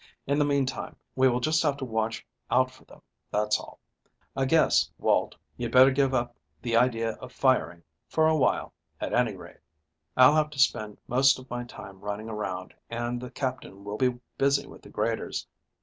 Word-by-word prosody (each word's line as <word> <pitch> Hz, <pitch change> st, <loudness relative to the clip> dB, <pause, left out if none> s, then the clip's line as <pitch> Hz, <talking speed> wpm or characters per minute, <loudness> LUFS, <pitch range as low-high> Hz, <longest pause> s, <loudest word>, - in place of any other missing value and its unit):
In 140 Hz, +2 st, +1 dB
the 145 Hz, -, +4 dB
meantime 140 Hz, -2 st, -1 dB, 0.2 s
we 130 Hz, 0 st, +5 dB
will 125 Hz, 0 st, +1 dB
just 155 Hz, +5 st, +2 dB
have 145 Hz, -3 st, +1 dB
to 135 Hz, -, -4 dB
watch 110 Hz, -1 st, -2 dB, 0.2 s
out 130 Hz, 0 st, +3 dB
for 130 Hz, -, -19 dB
them, -, -, -17 dB, 0.3 s
that's 105 Hz, +1 st, +1 dB
all. -, -, -12 dB, 0.6 s
I 135 Hz, -, +1 dB
guess, 160 Hz, +4 st, +4 dB
Walt, -, -, +1 dB, 0.2 s
you'd -, -, -3 dB
better 130 Hz, +1 st, +7 dB
give 135 Hz, 0 st, +2 dB
up 120 Hz, -2 st, -1 dB, 0.2 s
the 115 Hz, +5 st, -1 dB
idea 115 Hz, -1 st, +2 dB
of 130 Hz, -, -9 dB
firing 125 Hz, -10 st, +1 dB, 0.2 s
for 160 Hz, 0 st, +2 dB
a 160 Hz, -, +3 dB
while, 150 Hz, -, +1 dB, 0.3 s
at -, -, -3 dB
any -, -, +2 dB
rate. -, -, -13 dB, 0.6 s
I'll 130 Hz, +3 st, +8 dB
have 155 Hz, -1 st, +2 dB
to 150 Hz, -, -12 dB
spend 105 Hz, -5 st, +1 dB
most 135 Hz, +2 st, +4 dB
of 130 Hz, -1 st, -14 dB
my 120 Hz, 0 st, -3 dB
time 100 Hz, -5 st, -11 dB
running 105 Hz, +2 st, -5 dB
around, 95 Hz, -4 st, -4 dB, 0.2 s
and 120 Hz, +1 st, -3 dB
the 125 Hz, -, -6 dB
Captain 130 Hz, -8 st, -5 dB
will 105 Hz, +1 st, -5 dB
be 125 Hz, 0 st, +1 dB, 0.2 s
busy 140 Hz, +1 st, +3 dB
with -, -, -13 dB
the -, -, -14 dB
graders. -, -, -2 dB
125 Hz, 190 wpm, -27 LUFS, 115-135 Hz, 0.6 s, I'll